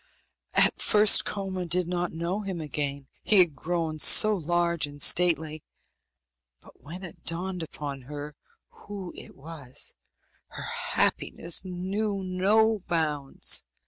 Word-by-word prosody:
At - - +2
first 210 0 +6
Koma 190 -3 -4
did 175 +1 +2
not 175 0 -2
know 170 +5 -3
him 190 -4 -5
again, 140 -2 -4
he 210 - +2
had 175 -5 +5
grown 160 +1 -3
so 215 +7 +7
large 170 -2 0
and 145 0 -12
stately; 160 -1 +3 1.0
but - - -19
when 175 +6 -10
it 175 - -11
dawned 180 +2 -4
upon 145 -3 -7
her 150 0 -7 0.3
who 200 -3 -9
it - - -12
was, 140 -3 -6 0.5
her - - -9 0.3
happiness 170 +1 0
knew 195 +2 -3
no 205 +4 +2
bounds. 150 -5 0
175 Hz, 125 wpm, -27 LUFS, 150-190 Hz, 1.0 s, so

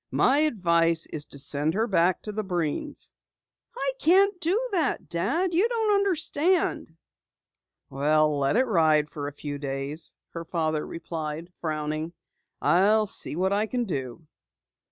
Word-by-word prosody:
"My 275 +2 +3
advice 170 - +2
is 150 -1 -3
to - - -13
send 145 +3 -1
her 220 +2 +2
back 185 -4 +2
to 210 - -5
the 215 +1 -3
Breens." 180 - -3 0.7
"I - - 0
can't 390 +3 +5
do 360 +6 +2
that, 335 -8 0
Dad. 320 - 0
You 385 +8 +3
don't 445 -3 +1
understand." 350 - +1 0.9
"Well, 150 +2 +2
let 140 +6 +1
it 255 +3 +4
ride 155 -8 +3
for 145 -2 -5
a - - -4
few 145 0 -6
days," 140 +3 -4 0.2
her 165 - -6
father 160 -2 -1
replied, 165 0 -5
frowning. 155 +1 -3 0.5
"I'll 210 +4 +4
see 190 - -4
what 190 +3 +1
I 210 +2 +1
can 245 +1 -1
do." 135 - -5
170 Hz, 145 wpm, -26 LUFS, -, 0.9 s, can't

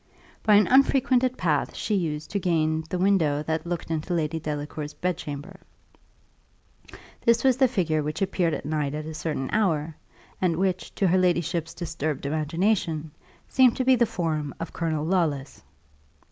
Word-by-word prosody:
By 210 -1 +5
an 210 - +6
unfrequented 260 -1 +3
path 155 -5 0
she 215 - -2
used 155 -6 -2
to 200 - 0
gain 160 -3 +1
the 180 - -2
window 170 -6 +2
that 160 +1 -2
looked 170 -1 -4
into 160 +2 -2
Lady 160 0 -1
Delacour's 150 0 -5
bedchamber. 150 -4 -4 1.6
This 235 0 +3
was 260 -2 +4
the 265 -1 +5
figure 170 -10 0
which 150 +1 -4
appeared 180 -4 0
at - - -7
night 150 -1 -1
at 155 0 -5
a 160 - -6
certain 150 -4 -3
hour, 165 -7 0 0.5
and 180 -3 +2
which, 185 -1 -1
to 195 - +1
her 185 +1 +4
ladyship's 175 -2 0
disturbed 155 -4 -3
imagination, 160 +1 0 0.4
seemed 255 -3 +4
to 255 - 0
be 260 0 +6
the 235 -1 +2
form 155 -6 -2
of 165 - -6
Colonel 160 -3 -1
Lawless. 155 -6 -1
165 Hz, 160 wpm, -25 LUFS, 155-190 Hz, 1.6 s, an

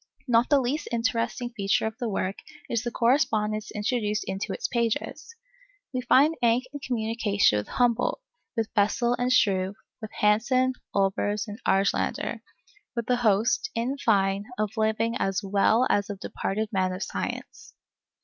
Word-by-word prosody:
Not 235 0 +3
the 285 -2 +5
least 275 +4 -2
interesting 235 +1 -1
feature 200 -2 0
of 220 0 -3
the 240 -3 -2
work 195 -1 -2 0.3
is 230 -2 -1
the 240 - -3
correspondence 220 -4 +1
introduced 210 -1 -1
into 190 +1 -3
its - - -2
pages. 235 - -2 0.6
We 255 - -1
find 280 +5 +4
Encke 235 +2 +3
in 285 - -5
communication 220 - +1
with 105 - -6
Humboldt, 245 - +1 0.4
with 225 -1 -1
Bessel 235 +4 +2
and 250 +1 +1
Struve, 195 -5 +2 0.3
with 220 - -6
Hansen, 255 +5 +2 0.2
Olbers, 200 +2 0
and 210 +4 -8
Argelander; 195 +1 0 0.5
with 235 -2 -3
a 250 - +3
host, 230 - +2
in 240 +4 -1
fine, 200 -4 +2
of 215 0 -2
living 220 +1 0
as 195 +1 -1
well 205 +5 +3
as 205 0 +1
of 200 -2 -5
departed 210 +3 -3
men 185 -2 0
of 185 - -4
science. 450 0 -6
220 Hz, 150 wpm, -26 LUFS, 205-245 Hz, 0.6 s, the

